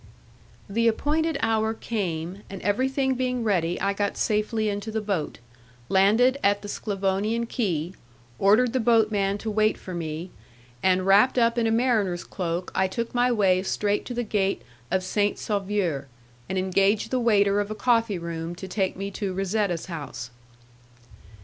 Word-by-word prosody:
The 230 Hz, +3 st, +1 dB
appointed 310 Hz, +8 st, +1 dB
hour 220 Hz, 0 st, +1 dB
came, 185 Hz, -5 st, -3 dB
and 195 Hz, -, -7 dB
everything 265 Hz, +5 st, +1 dB
being 250 Hz, -1 st, -1 dB
ready 175 Hz, -5 st, 0 dB
I 200 Hz, 0 st, +1 dB
got 200 Hz, 0 st, -2 dB
safely 215 Hz, +1 st, 0 dB
into 205 Hz, +1 st, -3 dB
the 220 Hz, 0 st, -1 dB
boat, 200 Hz, -7 st, -2 dB, 0.5 s
landed 225 Hz, +8 st, +4 dB
at 205 Hz, 0 st, +2 dB
the -, -, -6 dB
Sclavonian 205 Hz, +3 st, -1 dB
quay, 180 Hz, -8 st, -2 dB, 0.5 s
ordered 225 Hz, +5 st, +4 dB
the 260 Hz, -, +1 dB
boatman 215 Hz, -4 st, +2 dB
to 220 Hz, +1 st, -4 dB
wait 215 Hz, +1 st, +2 dB
for 185 Hz, -, -8 dB
me, 165 Hz, +1 st, -5 dB, 0.5 s
and 185 Hz, 0 st, +2 dB
wrapped 205 Hz, +7 st, +5 dB
up 235 Hz, -1 st, +3 dB
in 235 Hz, -2 st, +1 dB
a -, -, +1 dB
mariner's 220 Hz, -7 st, +1 dB
cloak 175 Hz, -1 st, -4 dB
I 190 Hz, 0 st, +2 dB
took 235 Hz, +5 st, -4 dB
my 245 Hz, 0 st, +3 dB
way 190 Hz, -5 st, +3 dB
straight 205 Hz, +2 st, 0 dB
to 245 Hz, -, -5 dB
the 240 Hz, -, -1 dB
gate 195 Hz, -, -1 dB, 0.3 s
of 190 Hz, 0 st, 0 dB
Saint 205 Hz, +2 st, 0 dB
Sauveur, 195 Hz, -9 st, -1 dB, 0.4 s
and 190 Hz, -, -2 dB
engaged 195 Hz, +4 st, +1 dB
the 255 Hz, -, +1 dB
waiter 205 Hz, -4 st, +3 dB
of 205 Hz, 0 st, -2 dB
a 215 Hz, -, -4 dB
coffee 230 Hz, -4 st, +2 dB
room 170 Hz, 0 st, -5 dB
to 190 Hz, -, -8 dB
take 190 Hz, -1 st, -1 dB
me 200 Hz, +1 st, -4 dB
to 195 Hz, -2 st, -3 dB
Razetta's 195 Hz, -2 st, -1 dB
house. 145 Hz, -8 st, -7 dB
205 Hz, 160 wpm, -25 LUFS, 190-225 Hz, 0.5 s, wrapped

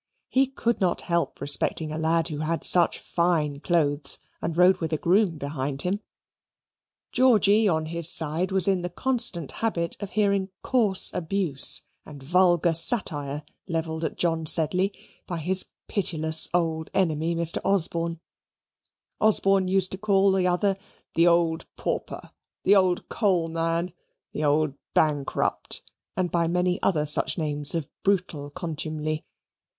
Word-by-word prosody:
He 265 Hz, +1 st, +2 dB
could 235 Hz, -4 st, -2 dB
not 180 Hz, -2 st, 0 dB
help 170 Hz, -1 st, -2 dB
respecting 145 Hz, +2 st, +2 dB
a 155 Hz, -, -4 dB
lad 165 Hz, +1 st, +1 dB
who 150 Hz, -2 st, -5 dB
had 160 Hz, +2 st, -3 dB
such 175 Hz, -2 st, +5 dB
fine 160 Hz, -5 st, -1 dB
clothes 145 Hz, -4 st, 0 dB, 0.2 s
and 165 Hz, 0 st, -4 dB
rode 180 Hz, +1 st, +5 dB
with 160 Hz, -2 st, -4 dB
a -, -, +1 dB
groom 180 Hz, +1 st, +1 dB
behind 140 Hz, -1 st, -3 dB
him. 190 Hz, +3 st, -2 dB, 1.1 s
Georgy, 220 Hz, -4 st, +3 dB
on 160 Hz, -2 st, -1 dB
his 170 Hz, 0 st, +4 dB
side, 165 Hz, +2 st, -1 dB
was 190 Hz, -1 st, +5 dB
in 190 Hz, -2 st, +1 dB
the 175 Hz, -, -4 dB
constant 205 Hz, -, +1 dB
habit 170 Hz, -7 st, -2 dB
of 205 Hz, -, -6 dB
hearing 200 Hz, -2 st, 0 dB
coarse 215 Hz, -7 st, +3 dB
abuse 175 Hz, -4 st, +2 dB, 0.2 s
and 145 Hz, -3 st, -13 dB
vulgar 175 Hz, +1 st, +2 dB
satire 150 Hz, -, 0 dB, 0.2 s
levelled 160 Hz, -2 st, -4 dB
at -, -, -4 dB
John 165 Hz, -2 st, -1 dB
Sedley 180 Hz, +5 st, +2 dB, 0.4 s
by 175 Hz, -, -4 dB
his 185 Hz, +4 st, +3 dB, 0.2 s
pitiless 160 Hz, -5 st, +2 dB
old 165 Hz, -2 st, -1 dB
enemy, 165 Hz, -2 st, 0 dB
Mr. 170 Hz, 0 st, 0 dB
Osborne. 170 Hz, -3 st, 0 dB, 1.0 s
Osborne 195 Hz, -3 st, +2 dB
used 185 Hz, 0 st, +2 dB
to 190 Hz, -, -7 dB
call 195 Hz, -1 st, +2 dB
the 190 Hz, -1 st, +1 dB
other 190 Hz, +2 st, 0 dB, 0.4 s
the 170 Hz, +1 st, +3 dB
old 170 Hz, -1 st, +1 dB
pauper, -, -, -5 dB, 0.3 s
the 200 Hz, -, +4 dB
old 185 Hz, -2 st, +1 dB
coal 185 Hz, -7 st, 0 dB
man, 165 Hz, +1 st, -2 dB, 0.4 s
the 155 Hz, -, -4 dB
old 150 Hz, 0 st, +1 dB, 0.2 s
bankrupt, 145 Hz, -3 st, 0 dB, 0.3 s
and 180 Hz, -2 st, -1 dB
by 170 Hz, -1 st, 0 dB
many 180 Hz, +1 st, -1 dB
other 150 Hz, -5 st, 0 dB
such 150 Hz, -, +3 dB
names 150 Hz, -2 st, +1 dB
of 160 Hz, -4 st, -3 dB
brutal 180 Hz, -7 st, -1 dB
contumely. 155 Hz, -1 st, -5 dB
170 Hz, 145 wpm, -25 LUFS, 155-190 Hz, 1.1 s, such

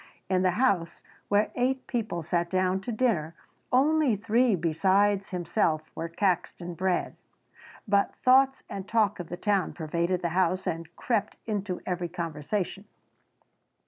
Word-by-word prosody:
In 185 Hz, -1 st, +3 dB
the 185 Hz, -, +3 dB
house, 195 Hz, -10 st, +1 dB, 0.2 s
where 205 Hz, +1 st, +2 dB
eight 255 Hz, +1 st, 0 dB
people 220 Hz, -9 st, -3 dB
sat 170 Hz, +1 st, 0 dB
down 185 Hz, +1 st, +1 dB
to 240 Hz, -, -4 dB
dinner, 210 Hz, -10 st, 0 dB, 0.4 s
only 285 Hz, -1 st, +3 dB
three 225 Hz, +2 st, +2 dB
besides 190 Hz, +5 st, +2 dB
himself 170 Hz, -3 st, -1 dB
were 165 Hz, -, -4 dB
Caxton 175 Hz, -1 st, -1 dB
bred, 185 Hz, +1 st, -1 dB, 0.7 s
but 200 Hz, -1 st, +2 dB
thoughts 270 Hz, +1 st, +4 dB
and 195 Hz, 0 st, -6 dB
talk 210 Hz, -3 st, +2 dB
of 175 Hz, -, -6 dB
the 175 Hz, -, -5 dB
town 200 Hz, -1 st, 0 dB
pervaded 170 Hz, +3 st, -1 dB
the 170 Hz, -, +1 dB
house 185 Hz, +1 st, +1 dB
and 165 Hz, 0 st, -4 dB
crept 225 Hz, -5 st, -1 dB
into 205 Hz, -4 st, -3 dB
every 175 Hz, -1 st, -2 dB
conversation. 170 Hz, +4 st, -3 dB
190 Hz, 140 wpm, -28 LUFS, 170-215 Hz, 0.7 s, thoughts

